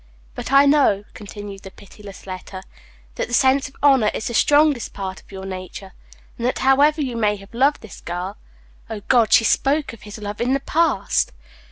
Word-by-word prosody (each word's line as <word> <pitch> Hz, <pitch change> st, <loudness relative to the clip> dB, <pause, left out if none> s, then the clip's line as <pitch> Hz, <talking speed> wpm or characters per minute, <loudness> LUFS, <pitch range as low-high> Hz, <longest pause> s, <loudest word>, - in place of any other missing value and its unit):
"But -, -, -6 dB
I 275 Hz, +1 st, +6 dB
know," 280 Hz, -9 st, +3 dB
continued 205 Hz, -1 st, -9 dB
that 190 Hz, -, -12 dB
pitiless 200 Hz, 0 st, -13 dB
letter, 185 Hz, 0 st, -8 dB, 0.5 s
"that -, -, -2 dB
the 240 Hz, -, -1 dB
sense 270 Hz, +2 st, +3 dB
of 270 Hz, -, -24 dB
honor 265 Hz, -7 st, +5 dB
is -, -, -4 dB
the 235 Hz, -, -3 dB
strongest 290 Hz, 0 st, +3 dB
part 190 Hz, -1 st, -6 dB
of -, -, -22 dB
your 190 Hz, -1 st, -8 dB
nature, 190 Hz, 0 st, -8 dB, 0.5 s
and 235 Hz, -, 0 dB
that, 255 Hz, -, -1 dB
however 290 Hz, +3 st, +3 dB
you 250 Hz, -3 st, -4 dB
may 210 Hz, -2 st, +1 dB
have 195 Hz, +2 st, -15 dB
loved 275 Hz, +5 st, +2 dB
this 220 Hz, -, -12 dB
girl" 180 Hz, +3 st, -5 dB, 0.5 s
(O 220 Hz, -2 st, -6 dB
God, 230 Hz, +1 st, +2 dB
she -, -, +6 dB
spoke 280 Hz, +4 st, +1 dB
of 230 Hz, -, -13 dB
his 210 Hz, 0 st, -10 dB
love 210 Hz, 0 st, -6 dB
in 250 Hz, +2 st, +1 dB
the 275 Hz, -, +1 dB
past!) 325 Hz, +4 st, 0 dB
225 Hz, 195 wpm, -21 LUFS, 195-275 Hz, 0.5 s, I